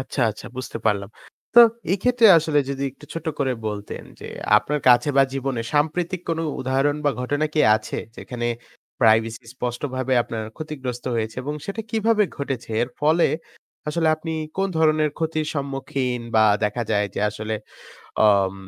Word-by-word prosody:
আচ্ছা, 130 +1 -4
আচ্ছা 105 - -10
বুঝতে 130 -2 -5
পারলাম। 100 -2 +1 0.5
তো 240 - +10 0.3
এক্ষেত্রে 235 +4 +4
আসলে 155 -2 +1
যদি 135 0 -3
একটু 140 +3 -16
ছোট 165 - -6
করে 135 -2 +1
বলতেন 105 -1 -5 0.2
যে - - -8 0.3
আপনার 145 +8 -3
কাছে 125 +4 +5
বা 135 - +7
জীবনে 135 -3 -2
সাম্প্রতিক 165 +4 0
কোন 165 - 0 0.2
উদাহরণ 135 +3 +1
বা 145 - +4
ঘটনা 145 +4 0
কি 155 - +3 0.2
আছে? - - -5 0.2
যেখানে 120 -1 -4 0.5
প্রাইভেসি 110 0 +3
স্পষ্টভাবে 130 +1 -3
আপনার 115 -1 -5
ক্ষতিগ্রস্ত 135 -6 -6
হয়েছে 110 -1 -2
এবং 145 +3 -3
সেটা 200 +3 -4
কিভাবে 220 -1 +2
ঘটেছে 135 -5 -4
এর 120 - -2
ফলে 155 +3 +4 0.6
আসলে 160 +1 +1
আপনি 160 +1 -5 0.2
কোন 195 0 +1
ধরনের 155 -1 +3
ক্ষতির 155 -1 -1
সম্মুখীন 135 -3 -2
বা 110 0 +6 0.2
দেখা 105 +3 -1
যায় 105 -1 +2
যে - - -2
আসলে 110 +1 -4 0.7
অম 100 -2 +3
135 Hz, 155 wpm, -23 LUFS, 120-155 Hz, 0.7 s, তো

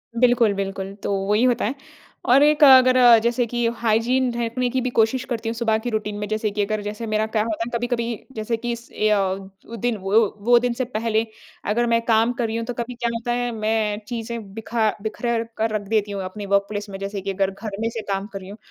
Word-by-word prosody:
बिल्कुल, 235 -3 +4
बिल्कुल, 195 0 -4
तो - - -1 0.2
वही 210 +3 +3
होता 245 -2 +2
है 245 +6 -2 0.5
और 265 +4 +6
एक 300 0 +4
अगर 255 -2 +8 0.3
जैसे 240 +1 +1
कि 240 +1 -1 0.2
हाइजीन 240 +3 +2
रखने 245 +2 -1
की 260 +2 0
भी 255 - -1
कोशिश 240 +3 +2
करती 225 -2 -3
हूँ - - -2
सुबह 225 -2 +1
की 240 +2 -4
रूटीन 215 -2 -2
में। 210 - -3
जैसे 215 0 -1
कि 205 +1 -1
अगर 215 0 -2
जैसे 210 +2 -5
मेरा 215 0 +1
क्या 220 -1 0
होता 220 0 -3
है 235 - -5
ना? 235 - 0
कभी-कभी 235 -2 -3
जैसे 220 +1 -2
कि 240 +1 -3
इस 235 0 -7
ए 215 0 +1
अ, 210 - +4
वो 195 +3 -5
दिन 230 0 -1
वो 195 +3 +3 0.3
वो 240 0 +6
दिन 245 0 0
से 255 +1 -2
पहले 225 -1 0 0.5
अगर 240 +1 +1
मैं 230 0 +2
काम 225 +1 +3
कर 235 - +1
रही 225 - -4
हूँ, 230 - -3
तो 245 - -4
कभी 240 +1 -4
क्या 235 -1 -1
होता 235 +1 -3
है, 245 0 -1
मैं 215 -1 -1
चीज़ें 230 -4 -5
बिखा 225 0 0
बिखेर 230 +2 -1
कर 225 +1 +1
रख 205 -1 -3
देती 210 -1 0
हूँ 200 -1 -3
अपने 200 +2 -6
वर्क 200 0 +2
प्लेस 205 0 -5
में। 195 - -6
जैसे 195 0 -4
कि 195 +1 -3
अगर 195 0 0
घर 200 0 -7
में 230 - 0
से 230 -1 -5
काम 195 +1 -2
कर 195 - -4
रही 190 0 -11
हूँ, 205 - -9
225 Hz, 245 wpm, -22 LUFS, 210-240 Hz, 0.5 s, अगर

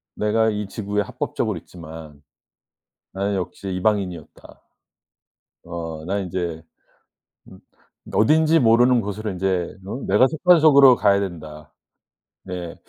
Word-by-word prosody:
'내가 110 +1 +1
이 105 -1 -3
지구에 105 0 -3
합법적으로 105 0 -3
있지만 80 -3 -12 0.9
나는 100 +2 -2
역시 95 +1 -5
이방인이었다.' 90 -4 -3 1.1
'어 80 -2 -6
난 100 +3 -2
인제 85 -3 -4 0.9
음 - - -14 0.5
그 - - -1
어딘지 160 +7 +4
모르는 120 +1 +4
곳으로 105 0 -5
이제 90 -1 -2
음 120 +7 -6
내가 105 +7 +4
속한 170 +3 +3
속으로 140 -4 +7
가야 100 -3 +3
된다.' 80 -5 -8 0.7
네 90 -3 -7
100 Hz, 250 characters per minute, -22 LUFS, 85-110 Hz, 1.1 s, 속으로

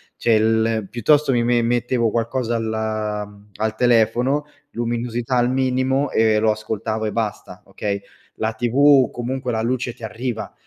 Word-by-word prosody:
cioè 115 -2 +2
l 110 -1 +1
piuttosto 145 +5 +2
mi 120 -1 +2
me 120 0 +2
mettevo 120 0 +1
qualcosa 120 +1 -1
al 115 -1 -2 0.8
al 110 0 -2
telefono, 120 +4 +2 0.3
luminosità 120 +1 -2
al 120 +1 +2
minimo 130 +1 +1
e 110 -1 +3
lo 110 0 +3
ascoltavo 110 +1 -3
e 105 - -1
basta, 105 -5 -4
okay, 100 0 -4 0.3
la 110 0 -2
TV 130 +3 +4
comunque 125 +1 -3
la 110 -1 -1
luce 120 0 -1
ti 115 - -17
arriva 115 +1 -5
115 Hz, 145 wpm, -21 LUFS, 110-125 Hz, 0.8 s, TV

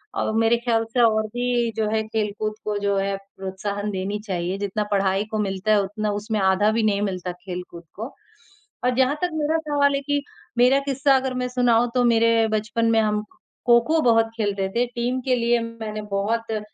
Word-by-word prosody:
और - - 0
मेरे 225 +1 +4
ख्याल 235 -1 +1
से 250 - +1
और 220 -2 +3
भी 245 -1 0
जो 220 -1 +1
है 220 0 +1
खेल-कूद 215 -1 -2
को 210 -1 -1
जो 200 0 0
है 195 0 0
प्रोत्साहन 195 +1 -5
देनी 195 +2 -3
चाहिए। 180 0 -2
जितना 200 +1 -2
पढ़ाई 195 0 +2
को 215 - -1
मिलता 195 +1 -1
है, 210 - +5
उतना 210 +2 -2
उसमें 210 +1 -2
आधा 190 +2 +3
भी 225 0 0
नहीं 205 -2 +2
मिलता 185 -3 -2
खेल-कूद 180 -1 -8
को 225 +6 -6 0.7
और 250 - +2
जहाँ 260 +2 +3
तक 360 - +1
मेरा 315 +1 +1
सवाल 285 -1 +3
है 275 - -1
कि 285 0 -1 0.4
मेरा 255 +3 +5
किस्सा 275 0 +3
अगर 265 0 -2
मैं 250 0 -1
सुनाऊँ, 245 -1 +3
तो 250 - +3
मेरे 230 -1 +4
बचपन 215 +2 -1
में 225 - +4
हम 210 -1 0 0.4
खो-खो 240 +7 +4
बहुत 225 -3 +4
खेलते 200 -3 -1
थे। 245 +1 +3
टीम 245 +2 -2
के 255 -1 +3
लिए 235 0 +2
मैंने 225 -2 -5
बहुत 225 +3 -1
अ, 215 - -1
220 Hz, 195 wpm, -23 LUFS, 200-240 Hz, 0.7 s, है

